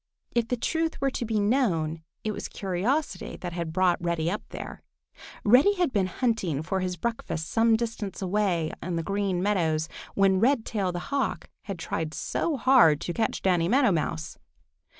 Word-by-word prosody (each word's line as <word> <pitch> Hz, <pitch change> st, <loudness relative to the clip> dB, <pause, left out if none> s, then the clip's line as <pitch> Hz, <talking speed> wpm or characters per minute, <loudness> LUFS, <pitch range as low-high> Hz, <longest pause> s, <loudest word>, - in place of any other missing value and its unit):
If 235 Hz, -1 st, +1 dB
the 250 Hz, -, -1 dB
truth 325 Hz, +7 st, -1 dB
were 275 Hz, 0 st, +1 dB
to 245 Hz, -, -3 dB
be 220 Hz, -1 st, 0 dB
known, 185 Hz, -, +1 dB, 0.2 s
it 215 Hz, -, -1 dB
was -, -, -5 dB
curiosity 210 Hz, -, -2 dB
that 175 Hz, -2 st, -6 dB
had 170 Hz, -2 st, -3 dB
brought 180 Hz, 0 st, +2 dB
Reddy 170 Hz, -1 st, 0 dB
up 210 Hz, -, -2 dB
there. -, -, -7 dB, 0.6 s
Reddy 265 Hz, -, +6 dB
had 355 Hz, -7 st, 0 dB
been 195 Hz, -3 st, +2 dB
hunting 185 Hz, -, -1 dB
for 190 Hz, +4 st, -1 dB
his 180 Hz, -1 st, -2 dB
breakfast 165 Hz, -6 st, -3 dB
some 225 Hz, 0 st, +4 dB
distance 225 Hz, -3 st, -3 dB
away 185 Hz, -4 st, 0 dB
on 175 Hz, +1 st, -3 dB
the 165 Hz, -, -1 dB
Green 195 Hz, -1 st, -1 dB
Meadows 165 Hz, -6 st, +1 dB, 0.3 s
when 195 Hz, -1 st, +4 dB
Redtail 220 Hz, -5 st, +1 dB
the 175 Hz, +10 st, -6 dB
Hawk 275 Hz, -1 st, -1 dB
had 195 Hz, -3 st, -4 dB
tried 160 Hz, -1 st, -3 dB
so 320 Hz, -4 st, -1 dB
hard 240 Hz, -, +5 dB
to 175 Hz, -, -3 dB
catch 225 Hz, +3 st, -1 dB
Danny 175 Hz, -3 st, +3 dB
Meadow 250 Hz, +2 st, +4 dB
Mouse. 80 Hz, -, -2 dB
195 Hz, 170 wpm, -27 LUFS, 170-235 Hz, 0.6 s, Reddy